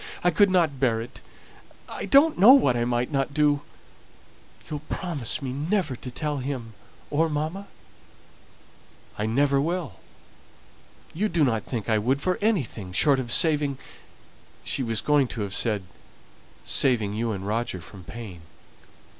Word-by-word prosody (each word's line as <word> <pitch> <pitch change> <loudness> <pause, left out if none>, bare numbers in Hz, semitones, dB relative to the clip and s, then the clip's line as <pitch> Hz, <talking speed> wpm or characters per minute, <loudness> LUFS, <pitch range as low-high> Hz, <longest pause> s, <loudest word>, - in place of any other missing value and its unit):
I 175 - +4
couldn't 175 -6 +3
bear 120 -4 +2
it. 115 +2 -9 0.7
I - - -6
don't 300 +3 +5
know 220 +8 +9
what 235 - +4
I 120 0 0
might 120 +3 -1
not 140 0 -1
do. 145 -1 +2 1.1
You'll 150 - -4
promise 150 - -2
me 130 -1 -3
never 155 0 -1
to 125 - -8
tell 150 +3 -3
him, 125 -4 -5 0.4
or 160 +3 +2
mamma?" 155 +7 -3 1.5
"I 105 - 0
never 140 +4 +2
will. 160 - -3 1.1
You 210 +6 -1
do 170 -4 +1
not 115 -6 0
think 115 -5 -4
I 110 -2 +2
would 130 +6 0
for 180 +4 -1
anything 140 - -1
short 140 +6 +3
of 120 -3 -4
saving 150 -3 +3 0.5
" - - -28
She - - -1
was 115 -4 -1
going 145 -3 +2
to 115 - -6
have 100 -1 -4
said, 105 -3 +1 0.8
"saving 110 -7 +2
you 115 +2 -2
and 95 -2 -5
Roger 110 -1 -2
from 95 +1 -13
pain." 100 -4 -9
135 Hz, 150 wpm, -25 LUFS, 115-155 Hz, 1.5 s, know